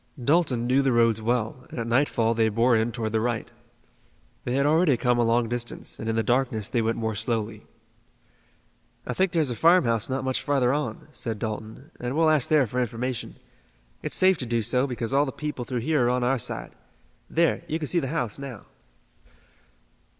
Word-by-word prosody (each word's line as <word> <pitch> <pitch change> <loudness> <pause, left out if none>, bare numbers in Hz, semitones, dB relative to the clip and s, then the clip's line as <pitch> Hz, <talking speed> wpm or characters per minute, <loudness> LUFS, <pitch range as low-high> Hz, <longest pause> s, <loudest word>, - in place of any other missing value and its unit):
Dalton 130 -3 +2
knew 130 +3 +3
the 135 -1 +2
roads 115 -2 +3
well, 120 +1 -2
and - - -9
at 115 - -2
nightfall 115 -2 +2
they 110 -1 +2
bore 115 +3 +3
in 110 +1 +1
toward 110 -2 -3
the 110 0 +1
right. 120 -1 -2 0.9
They 125 - -1
had 140 +1 +2
already 155 -2 +3
come 125 -1 +1
a - - +4
long 115 +1 +2
distance, 120 +1 -4
and 110 - -3
in 110 - 0
the 115 - +1
darkness 120 -4 0
they 120 - +1
went 115 +1 0
more 110 -1 -2
slowly. 110 -1 -3 1.4
"I - - -3
think 190 -1 +1
there's 155 -6 +1
a - - -3
farmhouse 145 - +3
not 130 0 -2
much 130 -1 -1
further 135 -3 +1
on," 145 -6 -3
said 115 -7 -3
Dalton, 110 +5 -6
"and 125 +2 -3
we'll 160 -1 +4
ask 150 -5 +2
there 150 -4 +4
for 125 +3 -3
information. 125 0 -3 0.7
It's - - -2
safe 185 -2 +4
to 125 - -4
do 115 -1 0
so 125 +5 +1
because 125 -1 -4
all 140 +1 +3
the - - -3
people 150 -3 -5
through 125 -2 -3
here 145 -1 +1
are - - +3
on 125 0 +1
our 130 +1 +1
side. - - -3 0.6
There, 165 0 +2
you 155 - -1
can 155 -2 -4
see 175 - +2
the 135 - -3
house 135 -6 -2
now." 135 -6 -8
125 Hz, 200 wpm, -25 LUFS, 115-140 Hz, 1.4 s, a